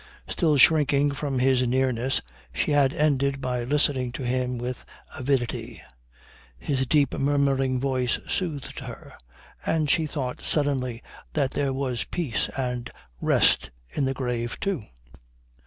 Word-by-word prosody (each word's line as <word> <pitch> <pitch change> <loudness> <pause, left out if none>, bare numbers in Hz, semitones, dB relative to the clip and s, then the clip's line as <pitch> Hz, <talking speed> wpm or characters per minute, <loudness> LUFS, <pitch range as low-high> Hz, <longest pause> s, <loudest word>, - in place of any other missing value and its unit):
Still 155 -5 +2
shrinking 145 0 +5
from 140 -1 -3
his 125 -1 +3
nearness 130 0 +1 0.3
she 65 - -1
had 140 -2 +4
ended 140 -3 +1
by 125 -2 -2
listening 130 -1 +2
to 130 - -5
him 125 0 -1
with 125 +1 -4 0.3
avidity. 130 -2 -1 0.8
His 130 - -1
deep 145 -1 +3
murmuring 135 -2 +1
voice 130 -2 +1
soothed 160 -7 -2
her. - - -9 0.5
And 155 -2 +1
she 160 +1 +2
thought 135 -4 -4
suddenly 130 -5 0 0.3
that 140 -3 +1
there 140 -1 0
was 130 -2 -2
peace 135 -12 -2
and 125 -2 -2 0.3
rest - - +3 0.2
in 140 - 0
the 135 0 -1
grave 120 -3 -3
too. 190 - -2
135 Hz, 130 wpm, -26 LUFS, 125-145 Hz, 0.8 s, shrinking